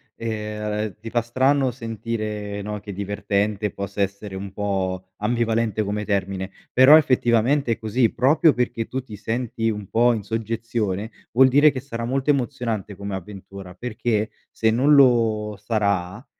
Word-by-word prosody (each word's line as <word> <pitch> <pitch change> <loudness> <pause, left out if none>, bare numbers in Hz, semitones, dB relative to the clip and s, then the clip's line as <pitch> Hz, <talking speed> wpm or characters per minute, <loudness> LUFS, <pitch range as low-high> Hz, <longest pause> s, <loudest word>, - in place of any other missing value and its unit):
ehm, 105 -2 -3
ti 115 +1 -7
fa 120 +1 +1
strano 130 +3 +2
sentire, 110 -3 -4
no, 105 +1 -4
che 100 0 -8
divertente 100 +1 -1
possa 100 +1 -5
essere 100 0 -3
un 95 0 -6
po' 95 -2 -2
ambivalente 115 -1 0
come 105 +1 -3
termine, 95 -1 -2 0.2
però 130 +4 +8
effettivamente 125 -2 +3
è - - -7
così, 110 +1 +1
proprio 150 +4 +4
perché 120 -2 -2
tu 130 - -3
ti 110 -5 -10
senti 115 +1 -2
un 105 -2 -4
po' 120 +1 +4
in 110 -3 -3
soggezione, 110 -1 -3 0.2
vuol 130 +2 +6
dire 145 +3 +6
che 130 - -5
sarà 115 -3 -5
molto 135 +3 -1
emozionante 115 -6 -1
come 100 0 -5
avventura, 95 0 -9
perché 110 +1 -2 0.2
se 110 0 +1
non 135 +6 +4
lo 115 -6 +3
sarà, 100 0 -1
110 Hz, 150 wpm, -23 LUFS, 100-120 Hz, 0.2 s, però